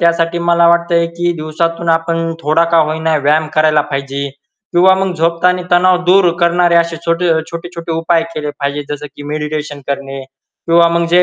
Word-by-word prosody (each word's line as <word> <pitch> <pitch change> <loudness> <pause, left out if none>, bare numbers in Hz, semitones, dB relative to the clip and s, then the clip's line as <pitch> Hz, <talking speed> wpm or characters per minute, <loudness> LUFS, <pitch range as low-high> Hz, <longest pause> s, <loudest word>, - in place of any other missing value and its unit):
त्यासाठी 170 0 +1
मला 170 0 +3
वाटतंय, 170 0 +2
की 175 +1 -2
दिवसातून 165 +2 -3
आपण 165 0 0
थोडा 155 +2 +2
का 165 - +5
होईना 160 0 +1
व्यायाम 150 +2 +1
करायला 155 -1 +3
पाहिजे. 140 0 -3 0.4
किंवा 185 +2 +5
मग 190 -1 -1
झोपतानी 175 +2 +1
तणाव 180 +1 +4
दूर 180 0 +4
करणारे 170 0 +3
असे 170 0 +1
छोटे-छोटे-छोटे 170 0 -2
उपाय 165 +1 +1
केले 150 -1 -3
पाहिजे. 140 +1 -2
जसं 150 +1 -8
की - - -9
मेडिटेशन 150 -1 -4
करणे, 135 -1 -4 0.5
किंवा 170 0 +4
मग 170 0 0
जे 180 +1 +5
165 Hz, 160 wpm, -14 LUFS, 155-170 Hz, 0.5 s, का